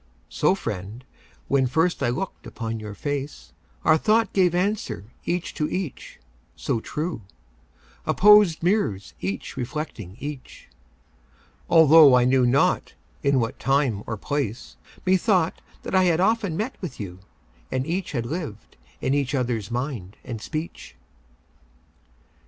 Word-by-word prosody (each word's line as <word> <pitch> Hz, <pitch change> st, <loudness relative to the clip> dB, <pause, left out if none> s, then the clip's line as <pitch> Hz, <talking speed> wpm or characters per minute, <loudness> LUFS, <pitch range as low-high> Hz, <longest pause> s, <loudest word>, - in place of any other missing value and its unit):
So, -, -, +2 dB
friend, 105 Hz, +7 st, -6 dB, 0.4 s
when 135 Hz, -2 st, +2 dB
first 160 Hz, +7 st, +1 dB
I -, -, +2 dB
look'd 155 Hz, +11 st, -4 dB
upon 115 Hz, -1 st, -4 dB
your 105 Hz, -1 st, -7 dB
face, 145 Hz, +3 st, -5 dB, 0.3 s
Our 160 Hz, -, +5 dB
thought 225 Hz, +4 st, +2 dB
gave 180 Hz, -3 st, +3 dB
answer 175 Hz, -, -2 dB
each 175 Hz, 0 st, -2 dB
to 150 Hz, -, -1 dB
each, 180 Hz, -, -5 dB, 0.4 s
so 115 Hz, -, -1 dB
true— 155 Hz, +3 st, -4 dB, 0.9 s
Opposed 205 Hz, -5 st, +6 dB
mirrors 140 Hz, -, 0 dB
each 95 Hz, +1 st, -4 dB
reflecting 120 Hz, -, -5 dB
each— 145 Hz, -2 st, -8 dB, 1.0 s
Altho' 160 Hz, -4 st, +8 dB
I 125 Hz, -1 st, +4 dB
knew 130 Hz, -1 st, +4 dB
not 135 Hz, +3 st, +2 dB, 0.3 s
in 140 Hz, -1 st, +3 dB
what 115 Hz, -1 st, -2 dB
time 135 Hz, -5 st, +1 dB
or 110 Hz, -, -3 dB
place, 130 Hz, -1 st, -3 dB, 0.3 s
Methought 185 Hz, -1 st, +2 dB, 0.2 s
that -, -, -6 dB
I 185 Hz, -1 st, +5 dB
had 170 Hz, -2 st, +3 dB
often 200 Hz, -3 st, +1 dB
met 220 Hz, +6 st, -4 dB
with 170 Hz, -9 st, -6 dB
you, 90 Hz, -3 st, -7 dB, 0.5 s
And 130 Hz, 0 st, -1 dB
each 175 Hz, +2 st, -3 dB
had 120 Hz, -4 st, -1 dB
lived 145 Hz, -, -6 dB, 0.2 s
in -, -, 0 dB
the 140 Hz, 0 st, +1 dB
other's 120 Hz, -5 st, -2 dB
mind 120 Hz, -6 st, -4 dB
and 115 Hz, -4 st, -6 dB
speech. 155 Hz, -, -6 dB
140 Hz, 135 wpm, -24 LUFS, 115-175 Hz, 1.0 s, Altho